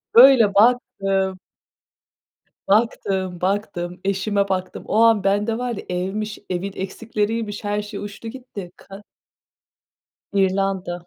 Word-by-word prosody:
Böyle, 235 Hz, -4 st, +8 dB
baktım 195 Hz, -4 st, +2 dB, 1.3 s
baktım, 195 Hz, -4 st, +1 dB
baktım, 185 Hz, -2 st, -2 dB
eşime 200 Hz, +1 st, 0 dB
baktım. 185 Hz, -1 st, -3 dB
O -, -, -1 dB
an 225 Hz, -4 st, +4 dB
bende 205 Hz, +3 st, +1 dB
var 245 Hz, -1 st, -2 dB
ya -, -, -6 dB
evmiş, 195 Hz, +4 st, -3 dB
evin 185 Hz, +2 st, -2 dB
eksikleriymiş, 210 Hz, +2 st, -3 dB
her 205 Hz, 0 st, -1 dB
şey 210 Hz, 0 st, -7 dB
uçtu 205 Hz, +2 st, -7 dB
gitti. 225 Hz, -8 st, -9 dB
Ka 195 Hz, +1 st, -12 dB, 1.3 s
İrlanda. 190 Hz, -2 st, 0 dB
200 Hz, 110 wpm, -22 LUFS, 190-215 Hz, 1.3 s, Böyle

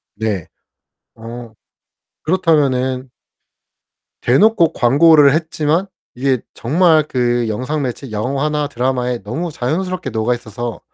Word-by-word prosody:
네. 100 Hz, -6 st, -3 dB, 0.7 s
어 115 Hz, 0 st, -9 dB, 0.7 s
그렇다면은 135 Hz, -7 st, +1 dB, 1.1 s
대놓고 170 Hz, -, +4 dB
광고를 145 Hz, +2 st, +5 dB
했지만 160 Hz, +2 st, 0 dB, 0.3 s
이게 130 Hz, -1 st, 0 dB
정말 160 Hz, +4 st, +3 dB
그 120 Hz, -2 st, 0 dB
영상 130 Hz, +7 st, -2 dB
매체 130 Hz, 0 st, -5 dB
영화나 140 Hz, +7 st, -1 dB
드라마에 125 Hz, -1 st, -2 dB
너무 155 Hz, -, -4 dB
자연스럽게 180 Hz, +8 st, -3 dB
녹아 110 Hz, +2 st, 0 dB
있어서 120 Hz, 0 st, -6 dB
130 Hz, 240 characters per minute, -17 LUFS, 120-155 Hz, 1.1 s, 광고를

